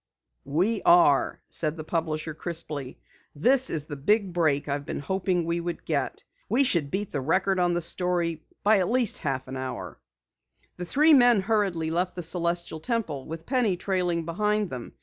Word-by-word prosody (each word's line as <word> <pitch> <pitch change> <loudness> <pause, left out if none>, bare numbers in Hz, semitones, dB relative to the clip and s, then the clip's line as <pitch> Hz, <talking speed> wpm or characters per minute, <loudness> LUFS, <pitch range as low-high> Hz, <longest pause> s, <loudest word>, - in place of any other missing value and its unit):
"We 190 +9 0
are," 170 -5 +4
said 155 0 0
the 155 - -5
publisher 160 -1 -2
crisply. 155 -4 -5 0.4
"This 255 - +3
is 150 -2 -3
the 150 - -6
big 195 +6 +1
break 155 -5 +1
I've 140 0 -2
been - - -5
hoping 180 +2 -1
we 170 +1 -1
would 170 0 -5
get! 140 -4 -2 0.3
We 245 +7 +3
should 170 - +2
beat 195 +5 -3
the 145 - -2
Record 185 +6 +1
on 175 -1 +2
the 175 -1 0
story 170 -2 0 0.2
by 210 0 +5
at 180 - 0
least 245 -2 +2
a - - -17
half 135 -3 -2
hour." 130 - -6 0.8
The 180 - -5
three 305 - +4
men 245 -6 +6
hurriedly 190 -6 0
left 180 +2 -1
the 175 - -5
Celestial 170 -1 -1
Temple, 160 - -3
with 165 +1 -7
Penny 240 -8 +1
trailing 180 -3 -1
behind 210 +3 0
them. 125 -2 -7
170 Hz, 175 wpm, -26 LUFS, 155-195 Hz, 0.8 s, men